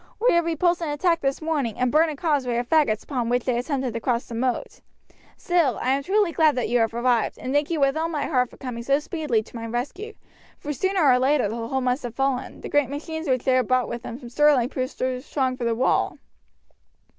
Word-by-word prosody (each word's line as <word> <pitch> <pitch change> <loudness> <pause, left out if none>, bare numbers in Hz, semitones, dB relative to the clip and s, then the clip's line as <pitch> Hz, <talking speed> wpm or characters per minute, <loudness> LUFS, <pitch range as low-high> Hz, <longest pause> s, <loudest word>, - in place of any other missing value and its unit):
"We 485 +3 +3
have 340 -1 +3
repulsed 345 +1 +1
an 325 - -2
attack 335 +3 +1
this 275 +3 -1
morning 285 -9 -1
and 250 -1 +1
burnt 315 +2 +4
a 305 - -4
causeway 275 -6 0
of 240 0 -2
faggots 285 -9 +2
upon 245 -5 -2
which 245 0 +1
they 250 - +1
attempted 260 -2 -2
to 230 - -3
cross 240 0 -1
the 235 - -10
moat; 245 +2 -2 0.6
still, 335 -9 +1
I 255 - 0
am 275 +1 +1
truly 395 +3 +1
glad 315 -3 +3
that 250 -4 -1
you 245 +1 +2
have 225 0 0
arrived, 240 -1 +1
and 255 - -4
thank 290 0 +1
you 330 -2 -1
with 275 0 +3
all 320 +1 -1
my 305 -3 -2
heart 250 -5 +1
for - - -16
coming 250 -3 -6
so 275 +4 +2
speedily 300 -7 -1
to 235 - -16
my 230 0 -5
rescue, 295 - -4 0.4
for 295 - -5
sooner 380 +4 0
or 250 -2 +5
later 265 -2 +2
the 230 +2 -4
hold 265 +1 -1
must 250 +2 0
have 240 -2 -6
fallen; 270 -1 -2
the - - -6
great 290 -3 +2
machines 320 +2 -5
which 255 -2 +1
they 255 -1 +3
brought 255 +1 +1
with 235 - -5
them 235 -1 -7
from 245 -3 -10
Stirling 275 -2 +3
proved 255 0 -4
too 255 0 -1
strong 260 -2 -1
for 250 -2 -4
the 230 -1 +1
wall." 255 - +1
265 Hz, 240 wpm, -24 LUFS, 245-305 Hz, 0.6 s, or